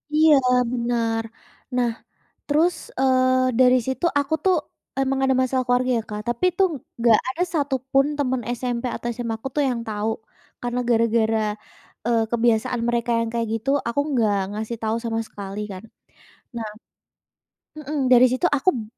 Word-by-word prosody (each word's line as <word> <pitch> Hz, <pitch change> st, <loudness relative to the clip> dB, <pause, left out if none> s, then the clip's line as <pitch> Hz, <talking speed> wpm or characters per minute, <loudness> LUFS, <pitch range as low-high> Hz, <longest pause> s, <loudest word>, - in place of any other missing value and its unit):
Iya, 310 Hz, 0 st, +6 dB, 0.4 s
benar. 230 Hz, -2 st, 0 dB, 0.5 s
Nah 240 Hz, -2 st, +2 dB, 0.6 s
terus, 320 Hz, +4 st, +3 dB, 0.3 s
eee, 255 Hz, -1 st, +3 dB
dari 255 Hz, 0 st, +6 dB
situ 265 Hz, +6 st, -1 dB
aku 285 Hz, +3 st, 0 dB
tuh 370 Hz, -2 st, +4 dB, 0.4 s
emang 270 Hz, 0 st, 0 dB
ada 265 Hz, 0 st, +3 dB
masalah 255 Hz, 0 st, 0 dB
keluarga 250 Hz, +1 st, +2 dB
ya -, -, -2 dB
Kak, 210 Hz, 0 st, -4 dB
tapi 240 Hz, +9 st, -2 dB
itu 385 Hz, -, +1 dB, 0.4 s
nggak 230 Hz, -2 st, +5 dB
ada 345 Hz, -, -2 dB
satupun 275 Hz, -2 st, +1 dB
teman 260 Hz, -3 st, 0 dB, 0.2 s
SMP 245 Hz, -1 st, -3 dB
atau -, -, -6 dB
SMA 230 Hz, -2 st, -3 dB
aku 270 Hz, -, -5 dB
tuh 295 Hz, -, +3 dB
yang 240 Hz, -2 st, -1 dB
tahu. 215 Hz, +1 st, -1 dB, 0.5 s
Karena 245 Hz, +1 st, -1 dB
gara-gara, 225 Hz, -1 st, +2 dB, 0.7 s
eee, 230 Hz, -1 st, +3 dB
kebiasaan 235 Hz, +1 st, +1 dB
mereka 235 Hz, 0 st, 0 dB
yang 230 Hz, -, 0 dB
kayak 230 Hz, -1 st, 0 dB
gitu, 245 Hz, +5 st, -2 dB, 0.2 s
aku 285 Hz, +5 st, 0 dB
enggak 225 Hz, -7 st, +2 dB, 0.2 s
ngasih 220 Hz, +2 st, -4 dB
tahu 220 Hz, +1 st, 0 dB
sama 225 Hz, -1 st, -1 dB
sekali 200 Hz, 0 st, -7 dB
kan. 185 Hz, +2 st, -8 dB, 0.7 s
Nah 220 Hz, -2 st, -3 dB, 1.1 s
mhm, 300 Hz, 0 st, -5 dB, 0.2 s
dari 250 Hz, +1 st, +8 dB
situ 260 Hz, +7 st, +1 dB
aku 370 Hz, +7 st, +3 dB
b 225 Hz, -, -4 dB
245 Hz, 155 wpm, -23 LUFS, 230-265 Hz, 1.1 s, dari